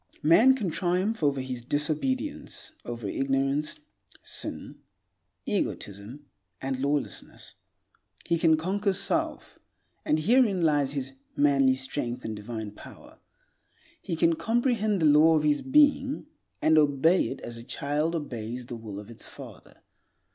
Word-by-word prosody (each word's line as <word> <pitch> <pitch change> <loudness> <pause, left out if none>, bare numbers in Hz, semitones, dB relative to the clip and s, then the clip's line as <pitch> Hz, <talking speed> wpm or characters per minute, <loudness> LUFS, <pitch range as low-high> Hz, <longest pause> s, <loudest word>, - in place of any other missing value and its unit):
Man 220 - +6
can 205 -10 -2
triumph 185 +6 0
over 140 -3 +1
his 130 -2 -5
disobedience, 155 - -2
over 120 -3 -5
ignorance, 135 +5 -1 0.5
sin, - - -3 0.7
egotism, 105 +9 -4 0.3
and 130 -1 -3
lawlessness. 140 -6 -3 0.7
He 170 - +1
can 160 -2 +4
conquer 195 +4 0
self; 320 - -1 0.4
and 155 - +2
herein 205 +1 +3
lies 145 -3 +2
his 135 -2 -4 0.2
manly 135 -2 +4
strength 130 -2 -4
and 110 - -3
divine 110 0 -6
power. 105 - -14 0.8
He 170 - -3
can 165 +1 +3
comprehend 225 - +1
the - - +5
law 155 +2 +6
of 150 - 0
his 150 -1 +2
being, 285 0 +3 0.4
and 155 0 +5
obey 150 +4 +3
it - - -6
as 120 0 -7
a 115 - -9
child 150 +6 -1
obeys 125 -5 -5
the 120 - -7
will 105 -3 -7
of 105 +2 -11
its 115 - -10
father. - - -13
150 Hz, 135 wpm, -27 LUFS, 130-185 Hz, 0.8 s, Man